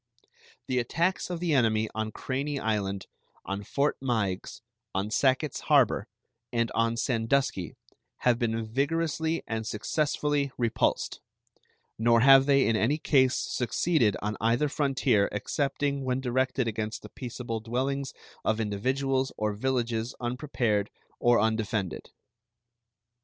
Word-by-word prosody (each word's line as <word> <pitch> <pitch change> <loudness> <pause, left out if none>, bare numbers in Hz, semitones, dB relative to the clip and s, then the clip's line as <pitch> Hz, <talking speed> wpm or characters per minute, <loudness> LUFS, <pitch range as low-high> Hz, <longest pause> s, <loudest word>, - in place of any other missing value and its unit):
The 130 -1 0
attacks 170 +12 0
of 175 -2 -3
the 170 -2 0
enemy 110 -4 +3
on 110 0 -2
Craney 140 +5 -3
Island, 100 -4 -1 0.4
on 100 +1 -3
Fort 140 +8 0
Meigs, 110 -8 -2 0.3
on 100 +3 -1
Sacketts 135 +3 +1
Harbor, - - +4 0.4
and 115 -1 0
on 115 +1 +1
Sandusky 115 - 0 0.5
have 120 -1 +3
been 115 -2 -1
vigorously 160 +6 -1
and 110 -1 -3
successfully 145 +4 0
repulsed; 115 -2 0 0.8
nor 115 0 +4
have 135 +1 +7
they 140 -1 +4
in 115 - +2
any 120 +8 +2
case 130 -4 +3
succeeded 125 - +1
on 105 0 -2
either 120 +6 +2
frontier 135 -8 +2
excepting 140 +5 -1
when 130 0 0
directed 130 0 0
against 110 0 -3
the - - -9
peaceable 120 -3 -5
dwellings 130 +4 -2 0.3
of 110 0 +1
individuals 130 +6 0
or 105 -1 0
villages 120 0 -1
unprepared 120 -5 -1 0.3
or 120 0 +4
undefended. 110 -4 -1
120 Hz, 120 wpm, -28 LUFS, 110-140 Hz, 0.8 s, have